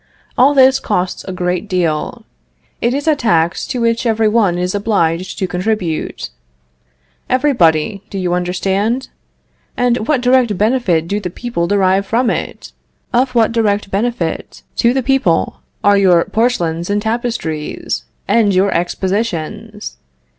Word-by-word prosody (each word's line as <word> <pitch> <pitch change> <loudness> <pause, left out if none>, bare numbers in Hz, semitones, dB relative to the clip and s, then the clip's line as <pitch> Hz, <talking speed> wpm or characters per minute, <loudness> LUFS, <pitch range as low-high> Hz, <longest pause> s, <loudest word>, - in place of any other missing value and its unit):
All 275 +3 +4
this 265 0 +5
costs 185 -6 -2
a 190 - -5
great 180 +2 -2
deal. 180 +6 -1 0.6
It 240 +2 +1
is 285 +2 -3
a 310 - +4
tax 170 - +1
to 250 - -3
which 230 +1 +1
every 220 -1 +2
one 210 -5 +2
is 180 +1 -1
obliged 185 -4 0
to 190 - -1
contribute. 180 -2 -2 1.0
Everybody, 200 - +2
do 195 - -6
you 180 -2 -1
understand? 195 +7 -1 0.7
And 245 -2 +1
what 290 -5 +2
direct 250 -5 +3
benefit 205 -7 +1
do 205 +3 -1
the 185 -3 -4
people 190 -3 -3
derive 195 0 +2
from 235 +2 +1
it? - - -5 0.4
Of 250 +1 +1
what 230 -1 +3
direct 210 -3 0
benefit 200 -5 -2
to 235 - +3
the 265 +1 0
people 265 -10 +1 0.2
are 205 0 +5
your 180 -4 +4
porcelains 175 -8 0
and 205 0 +1
tapestries, 220 -9 -3 0.2
and 210 -4 +3
your 190 +1 +3
expositions? 205 +3 -3
205 Hz, 140 wpm, -16 LUFS, 180-235 Hz, 1.0 s, this